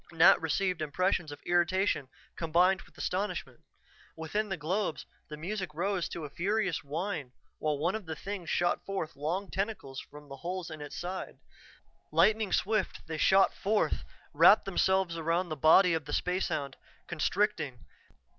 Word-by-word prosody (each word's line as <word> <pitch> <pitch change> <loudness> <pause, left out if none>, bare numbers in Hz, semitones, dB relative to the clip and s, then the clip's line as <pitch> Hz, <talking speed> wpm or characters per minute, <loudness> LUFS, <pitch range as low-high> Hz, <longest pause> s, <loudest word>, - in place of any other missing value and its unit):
Nat 170 +3 +6
received 180 +2 0
impressions 160 +1 0
of 145 - -10
irritation 175 -4 +1 0.3
combined 175 +4 +3
with - - -20
astonishment. 200 +3 -3 0.6
Within 205 +7 -2
the 190 - -2
globes, 175 +4 -2 0.2
the 150 - -7
music 185 0 -4
rose 185 +1 -1
to 165 - -5
a - - -7
furious 195 -1 0
whine 150 -2 -4 0.3
while 150 -1 0
one 170 +6 0
of 220 -5 -5
the 160 - -4
things 190 -1 -6
shot 175 0 +1
forth 195 -5 -4
long 175 +7 -3
tentacles 195 -10 -3
from 150 0 -12
the 135 -1 -9
holes 175 +2 -5
in 155 -1 -8
its 145 - -7
side. 180 +2 -5 0.7
Lightning 215 -2 +3
swift 215 0 0
they 160 -1 -5
shot 190 +3 +5
forth, 210 +2 0 0.3
wrapped - - +7
themselves 190 -3 +1
about 165 +2 0
the 155 - -2
body 165 +5 +6
of 160 -3 -1
the 145 - -6
spacehound, 160 -7 -1 0.3
constricting. 175 - -1
175 Hz, 155 wpm, -30 LUFS, 155-195 Hz, 0.7 s, wrapped